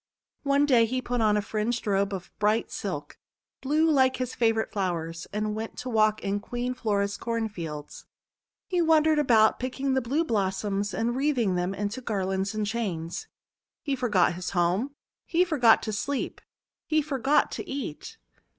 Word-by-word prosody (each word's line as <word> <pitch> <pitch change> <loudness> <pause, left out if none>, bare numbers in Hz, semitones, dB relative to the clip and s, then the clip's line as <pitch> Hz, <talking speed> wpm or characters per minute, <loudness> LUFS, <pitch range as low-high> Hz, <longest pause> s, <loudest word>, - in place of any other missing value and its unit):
One 280 0 +3
day 240 -5 +4
he 255 +3 -1
put 245 -1 -2
on 210 -1 +3
a 205 - 0
fringed 220 +3 -2
robe 200 -1 +1
of 190 -2 -6
bright 215 +2 +1
silk, - - -5 0.4
blue 305 +4 +2
like 265 -4 +4
his 255 -1 -3
favourite 225 -2 +1
flowers, 165 -4 -3
and 210 +1 -1
went 220 +1 -5
to 255 - -5
walk 215 -1 +2
in 200 +1 0
Queen 245 +4 -3
Flora's 200 -5 -1
Cornfields. 195 -11 -5 0.6
He 360 -2 0
wan 320 -2 +5
dered 310 -1 +3
about, 225 -6 +4
picking 265 +1 -2
the 265 - +2
blue 275 +7 0
blossoms, 200 - -1
and 235 +4 0
wreathing 260 -8 +1
them 180 +2 -1
into 205 +5 -3
garlands 195 -2 -1
and 215 -1 0
chains. 190 -7 -3 0.6
He 280 -3 0
forgot 210 -10 +2
his 180 +1 -4
home, 190 +11 +1 0.3
he 355 +1 +2
forgot 255 -10 +4
to 215 - -3
sleep, 275 +6 -3 0.5
he 310 -1 +2
forgot 280 -1 +2
to 375 - -6
eat. 270 - -5
225 Hz, 165 wpm, -27 LUFS, 200-265 Hz, 0.6 s, wan